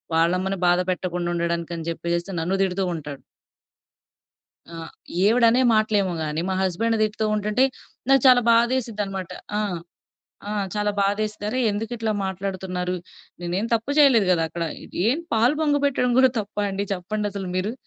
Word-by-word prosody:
వాళ్ళమ్మని 180 +4 +1
బాధ 175 0 +4
పెట్టకుండుండడానికని 170 -2 -2
చెప్పేసేసి 170 +2 -3
నన్ను 185 +4 0
తిడుతూ 190 0 -1
ఉంటాడు. 145 -3 -7 1.5
ఆ! - - -8 0.5
ఈవిడనే 230 +3 +4
మాటలేమో 210 -3 +2
గాని, 155 +1 -2
మా 190 - 0
హస్బెండ్ 225 +5 0
తిడుతూ 215 0 0
ఉంటుంటే, 210 +4 +1 0.4
నాకు 270 -2 +5
చాలా 250 -1 +7
బాదేసిద్దన్నమాట. 225 -6 0 0.3
ఆ! - - +1 0.9
ఆ! - - -2 0.2
చాలా 210 0 0
బాదేస్తారు. 210 +3 -1
ఎందుకిట్లా 225 +1 -2
మాట్లాడుతున్నారు? 185 -1 -3 0.5
నేనేం 180 +5 -1
తప్పు 230 +4 -2
చేయలేదు 260 -9 +6
గదా! 165 -2 +1
అక్కడ. 170 +1 -4 0.4
ఏం 265 +6 +1 0.2
పాలు 235 +6 +3
పొంగ‌బెట్టడం 285 -4 +1
గూడా 260 0 +6
తప్పా 205 0 -4
అండి? 195 +1 -2
చెప్పండసలు 200 +1 -4
మీరు. 190 +4 -1
200 Hz, 125 wpm, -23 LUFS, 180-225 Hz, 1.5 s, చాలా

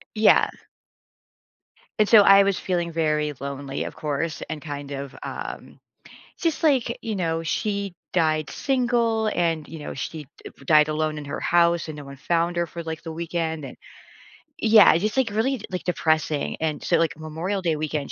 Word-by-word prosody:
Yeah. 215 - +5 1.5
And 210 - +3
so 225 - +9
I 195 0 +7
was 195 -2 +1
feeling 175 -2 -2
very 150 -2 0
lonely, 140 0 -4
of - - -7
course, 150 0 -3
and 155 -1 -5
kind 145 -1 -7
of, 140 -1 -6
um, - - -7 0.6
just 330 -1 -1
like, 260 -6 +2
you 220 - -3
know, 165 -3 -1
she 200 +2 -2 0.2
died 155 -3 +1
single 235 -4 +1
and, 165 -5 0
you 160 - -8
know, - - -6
she, 150 +1 -6 0.2
uh, - - -7
b - - -16
died 150 0 +5
alone 155 0 -1
in 150 - -7
her 140 - -4
house 170 -1 +2
and 155 -2 -7
no 145 - -8
one 140 0 -10
found 170 +4 0
her 170 - +1
for, 170 +1 -7
like, 160 -1 -6
the 165 -1 -6
weekend, 165 -2 -3
and 135 - -9 0.9
Yeah, 220 -1 +7
it's 165 - +1
just, 215 +4 -1
like, 255 -4 +2
really, 235 +3 0
like, 180 - -4
depressing. 155 -4 0
And 155 -2 -2
so, - - +2
like, 165 -2 +1
in 160 - -14
Memorial 170 +6 -3
Day 165 -3 0
weekend, 150 -1 -3
165 Hz, 185 wpm, -24 LUFS, 155-200 Hz, 1.5 s, so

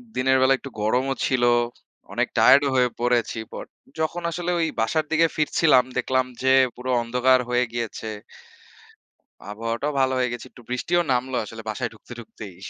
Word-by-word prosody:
দিনের 130 +1 +3
বেলা 130 +1 +5
একটু 135 - -9
গরমও 130 +5 +1
ছিল। 130 -2 0 0.7
অনেক - - 0
টায়ারড 140 - +7
ও - - +1
হয়ে 125 -1 +3
পড়েছি 120 -2 0
পর - - -6 0.3
যখন 160 +2 -1
আসলে 175 +1 -3
ওই 165 - +1
বাসার 150 +8 +1
দিকে 165 +1 +4
ফিরছিলাম 150 -3 +4
দেখলাম 130 +1 +1 0.2
যে 130 0 +4 0.2
পুরো 130 +1 -4
অন্ধকার 125 +2 +3
হয়ে 125 0 +2
গিয়েছে। 115 -2 -4 1.3
আবহাওয়াটাও 115 +7 -3
ভালো 130 0 +2
হয়ে 125 -1 0
গেছে। 120 - -7
একটু - - -15
বৃষ্টিও 170 +8 0
নামল 130 +1 -1
আসলে 115 +1 -9
বাসায় 120 +2 -3
ঢুকতে, 110 - -19
ঢুকতেই। 105 -4 -10
125 Hz, 160 wpm, -23 LUFS, 120-135 Hz, 1.3 s, টায়ারড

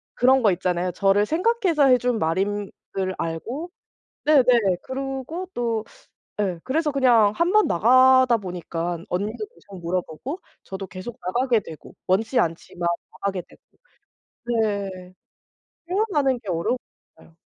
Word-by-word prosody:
그런 260 +1 +4
거 210 - +5
있잖아요. 180 0 -1
저를 195 +3 +3
생각해서 350 - +2
해 255 -1 +6
준 245 -1 0
말인 195 +5 -1 0.3
줄 190 -1 -1
알고 230 - -4 0.6
네네, 295 -4 +6 0.4
그러고 270 +6 -5
또 230 -2 -1 0.6
예. 185 -4 -1
그래서 300 +3 0
그냥 245 -7 +4
1 345 +2 +2
번 425 0 +5
나가다 255 +4 +5
보니까 175 -2 -4
언니도 210 - -3
계속 195 -3 -13
물어보고 180 - -3 0.2
저도 195 0 -6
계속 185 +5 -8
나가게 240 +4 +1
되고 160 -5 -12
원치 220 +7 +2
않지만 170 +1 -2 0.2
나가게 195 -3 -3
되고. - - -21 1.0
네. 195 -3 -4 0.8
표현하는 345 - +1
게 210 - -12
어려운 170 +8 0
것 - - -24
같아요. 165 - -20
220 Hz, 275 characters per minute, -23 LUFS, 185-265 Hz, 1.0 s, 해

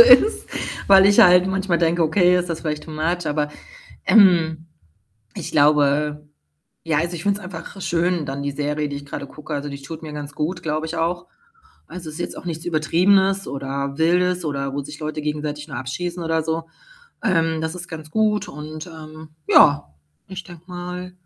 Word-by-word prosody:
ist, 475 -2 +7 0.4
weil 195 -1 +7
ich 200 +1 +6
halt 180 0 +7
manchmal 190 -2 0
denke: 170 +1 +2
„Okay, 180 +3 +4
ist 180 0 -2
das 165 - -3
vielleicht 150 -1 -3
too 160 - -10
much?“ 165 +3 -2
Aber, 150 0 -1 0.5
ähm, 165 -6 +4 0.7
ich - - -6
glaube 150 0 +3 0.6
ja, 160 -2 +1
also, 170 +3 -1
ich 165 - -6
finde 200 0 +1
es - - -12
einfach 185 +2 -8
schön 175 -2 0
dann 140 +1 -4
die 140 - -2
Serie, 150 +1 -2
die 140 - -4
ich 140 - -10
grade 140 - -6
gucke. 150 +2 -9
Also, 145 0 -3
die 140 0 -8
tut 160 +4 -8
mir 155 - -7
ganz 145 -1 -7
gut, 165 +5 -2
glaube 155 0 -1
ich 160 +1 -5
auch. 170 +2 -1 0.6
Also, 170 -3 -8
ist 155 - -9
jetzt - - -4
auch - - -10
nichts 165 -1 -4
Übertriebenes 190 +4 +2
oder 140 0 -4
Wildes 180 +2 +2
oder 140 -2 -2
wo 145 - -1
sich 145 +1 -10
Leute 155 0 -4
gegenseitig 150 0 -3
nur 135 -6 -6
abschießen 175 +7 -4
oder 160 -1 0
so. 160 +1 -2 0.6
Ähm, 165 -6 +1
das 160 +1 -3
ist 175 -1 -6
ganz 155 -2 -9
gut 210 +1 +1
und, 155 +2 -8
ähm, 155 -2 -11 0.2
ja, 145 - +5 0.3
ich 190 0 -7
denke 175 -3 -13
mal 180 0 -6
160 Hz, 190 wpm, -22 LUFS, 150-180 Hz, 0.7 s, ist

